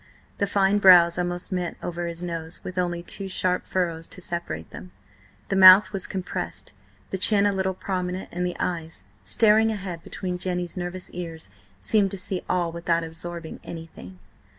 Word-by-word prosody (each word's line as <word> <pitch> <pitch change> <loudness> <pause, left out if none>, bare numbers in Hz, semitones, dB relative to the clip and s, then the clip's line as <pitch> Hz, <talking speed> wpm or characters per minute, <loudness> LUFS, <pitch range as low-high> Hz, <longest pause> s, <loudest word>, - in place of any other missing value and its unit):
The 200 - +1
fine 200 +1 +2
brows 175 -3 +7
almost 175 +2 -3
met 180 -2 -2
over 175 0 -3
his 170 +1 -5
nose 165 -1 -5
with 185 0 -4
only 175 -1 -1
two 195 +2 -4
sharp 185 -1 0
furrows 170 -3 -2
to - - -9
separate 170 - -5
them; 90 - -10 0.6
the 195 - 0
mouth 190 +2 +9
was 195 -2 -2
compressed, 95 - -5 0.4
the 190 - -2
chin 200 +1 +5
a 205 - +2
little 190 -1 -1
prominent, 185 -1 -3
and 180 +1 -3
the 180 0 -2
eyes, 165 -2 -3 0.2
staring 220 0 +4
ahead 190 -6 -5
between 180 -1 -5
Jenny's 180 -1 -3
nervous 180 0 -5
ears, 165 -2 -7 0.3
seemed 200 - +2
to 195 - -6
see 185 0 -3
all 175 -2 0
without 170 0 0
absorbing 165 0 -3
anything. 160 - -10
180 Hz, 170 wpm, -25 LUFS, 170-190 Hz, 0.6 s, mouth